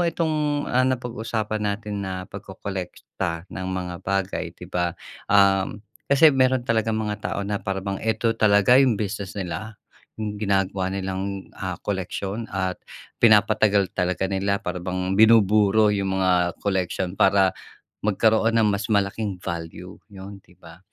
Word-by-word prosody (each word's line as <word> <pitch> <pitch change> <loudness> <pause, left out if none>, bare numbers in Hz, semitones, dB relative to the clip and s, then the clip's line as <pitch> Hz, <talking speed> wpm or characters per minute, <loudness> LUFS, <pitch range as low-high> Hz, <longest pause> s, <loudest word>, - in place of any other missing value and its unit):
itong, 150 -3 -1
ah, 125 - +1
napag-usapan 115 -4 -2
natin 105 0 -3
na 95 0 -5
pagkolekta 90 -3 -6
ng 95 - -5
mga 90 -1 -4
bagay, 95 -2 -2
'di - - -10
ba, 85 -1 -1 0.3
ah, 100 -1 +4 0.4
kasi 150 +3 +7
meron 130 -2 +3
talagang 110 -2 0
mga 105 -1 -2
tao - - -2
na 100 +1 -2
para 95 -1 -3
bang 95 0 -3
eto 115 0 0
talaga 105 +2 +5
yung 130 -6 +3
business 100 -2 -4
nila. 100 +3 -6 0.4
Yung 105 -1 -3
ginagawa 95 -2 0
nilang, 95 0 -4
ah, - - -5
koleksiyon 100 +4 -3
at 95 -1 -1 0.5
pinapatagal 105 -2 +4
talaga 90 0 0
nila 100 +1 -1
para 90 -4 -4
bang 90 +1 -2
binuburo 110 -1 +5
yung 95 -2 0
mga 90 -1 +2
koleksyon. 95 -1 -2
Para 95 -1 +3 0.4
magkaroon 110 +2 +2
ng 110 -2 +4
mas 100 +1 -2
malaking 100 -1 0
value 85 +1 -6
yun, 100 -1 -10
'di 90 - -22
ba? 85 0 -14
100 Hz, 140 wpm, -24 LUFS, 95-110 Hz, 0.5 s, kasi